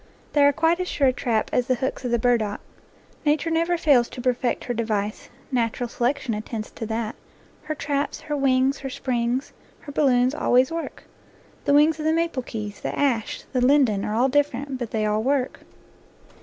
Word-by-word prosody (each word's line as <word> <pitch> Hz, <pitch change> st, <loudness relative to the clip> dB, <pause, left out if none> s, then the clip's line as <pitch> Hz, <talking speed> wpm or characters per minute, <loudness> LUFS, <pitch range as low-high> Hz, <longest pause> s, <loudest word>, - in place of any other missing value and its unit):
They 290 Hz, -, +4 dB
are 285 Hz, -, +6 dB
quite 325 Hz, +4 st, +2 dB
as 365 Hz, -, -2 dB
sure 275 Hz, -6 st, +2 dB
a -, -, 0 dB
trap 225 Hz, -3 st, -1 dB
as 250 Hz, 0 st, +1 dB
the 255 Hz, -, +2 dB
hooks 265 Hz, +1 st, -3 dB
of 250 Hz, -, -2 dB
the 235 Hz, -, +2 dB
burdock. 225 Hz, -3 st, +1 dB, 0.6 s
Nature 310 Hz, +2 st, +1 dB
never 335 Hz, +2 st, +1 dB
fails 275 Hz, -7 st, +4 dB
to -, -, -9 dB
perfect 245 Hz, 0 st, 0 dB
her 245 Hz, -, -2 dB
device. 215 Hz, -3 st, -2 dB, 0.2 s
Natural 240 Hz, -1 st, 0 dB
selection 245 Hz, +1 st, -1 dB
attends 215 Hz, +1 st, -5 dB
to 225 Hz, -, -6 dB
that. 225 Hz, 0 st, -3 dB, 0.5 s
Her 310 Hz, 0 st, -4 dB
traps, 285 Hz, -1 st, -2 dB
her 295 Hz, -, -3 dB
wings, 270 Hz, 0 st, +2 dB
her 270 Hz, -, -5 dB
springs, 255 Hz, -1 st, -2 dB, 0.3 s
her 290 Hz, -, -9 dB
balloons, 255 Hz, -3 st, +3 dB
always 260 Hz, -3 st, +3 dB
work. 330 Hz, 0 st, -5 dB, 0.6 s
The 285 Hz, -, +4 dB
wings 305 Hz, +2 st, +4 dB
of 305 Hz, -, -4 dB
the 315 Hz, -, +3 dB
maple 330 Hz, -5 st, 0 dB
keys, 210 Hz, -4 st, -6 dB
the -, -, -4 dB
ash, 245 Hz, -7 st, 0 dB
and -, -, -28 dB
the 250 Hz, -, +4 dB
linden 260 Hz, -8 st, +3 dB
are 210 Hz, -, -2 dB
all 245 Hz, +4 st, +3 dB
different, 280 Hz, -1 st, 0 dB
but 240 Hz, -3 st, -4 dB
they 215 Hz, -1 st, -1 dB
all 210 Hz, 0 st, +1 dB
work. 265 Hz, +1 st, 0 dB
255 Hz, 195 wpm, -24 LUFS, 235-285 Hz, 0.6 s, are